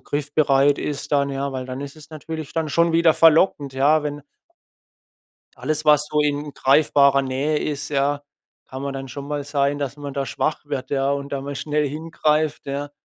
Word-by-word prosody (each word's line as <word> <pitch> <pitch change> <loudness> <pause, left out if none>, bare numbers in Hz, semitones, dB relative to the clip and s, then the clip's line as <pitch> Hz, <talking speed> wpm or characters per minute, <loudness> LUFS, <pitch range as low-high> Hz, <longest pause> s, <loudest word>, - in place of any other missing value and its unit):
griffbereit 145 -1 +2
ist 145 -1 -4
dann, 140 -1 +2
ja, 140 +1 -2
weil 130 -1 -5
dann 130 +1 -6
ist 140 +2 -8
es 155 - -14
natürlich 155 0 -7
dann 160 -1 -1
schon 170 +3 +2
wieder 165 -1 +4
verlockend, 160 -4 +4
ja, 145 +3 +3
wenn 145 -1 -4 1.3
Alles, 150 +5 -3
was 150 -1 +4
so 150 - +1
in 145 0 -1
greifbarer 140 0 +4
Nähe 140 +3 -1
ist, 145 -1 -3
ja 145 +1 0 0.5
kann 130 +1 -7
man 140 0 -3
dann 135 0 -5
schon 140 +3 -8
mal 145 -1 -3
sein, 145 0 0
dass 140 -1 -4
man 145 -1 -7
da 140 -1 -2
schwach 155 - -2
wird, 140 -3 -5
ja, 135 0 +1
und 140 0 -3
da 140 - -2
mal 140 +1 -6
schnell 150 +1 -1
hingreift, 155 0 -1
ja. 140 +1 -4
145 Hz, 190 wpm, -22 LUFS, 140-150 Hz, 1.3 s, wieder